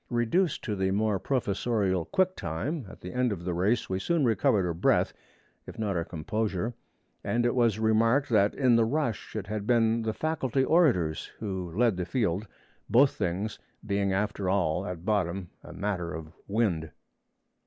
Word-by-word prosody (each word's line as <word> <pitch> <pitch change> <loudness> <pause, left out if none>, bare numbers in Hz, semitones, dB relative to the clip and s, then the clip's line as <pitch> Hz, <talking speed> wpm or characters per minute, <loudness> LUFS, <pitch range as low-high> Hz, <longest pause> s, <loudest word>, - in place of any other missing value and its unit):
Reduced 130 +9 +1
to 105 - -2
the 95 -1 0
more 105 0 +1
professorial 100 -6 0
'quick 185 0 +1
time' 105 - -3
at - - -13
the 90 - -7
end 125 -1 +1
of 85 -4 -5
the 90 - -1
race, 100 +7 +1
we 95 0 -2
soon 165 - +1
recovered 105 -3 +2
our 85 - -1
breath 85 - +2 0.5
if - - -9
not 105 -3 -1
our 85 - 0
composure, 100 +6 -2 0.5
and 120 0 0
it 120 - +2
was 120 -4 +2
remarked 115 +5 +3
that 105 -3 +3
in 125 -4 +4
the 115 - +4
rush 120 -2 -2
it 105 -4 -3
had 105 0 -4
been 115 -1 +3
the 110 -1 -1
Faculty 140 -5 0
orators 125 - +2
who 95 -5 -4
led 115 -5 +3
the 90 - -2
field; 100 0 -1 0.4
both 130 +5 +5
things 95 +5 -2 0.3
being 100 -1 0
after 95 -1 -1
all 90 -5 +1
at 90 -1 -6
bottom 95 -4 -1
a - - -10
matter 90 -4 -3
of 80 -1 -7
wind. 100 -7 0
105 Hz, 175 wpm, -28 LUFS, 90-120 Hz, 0.5 s, both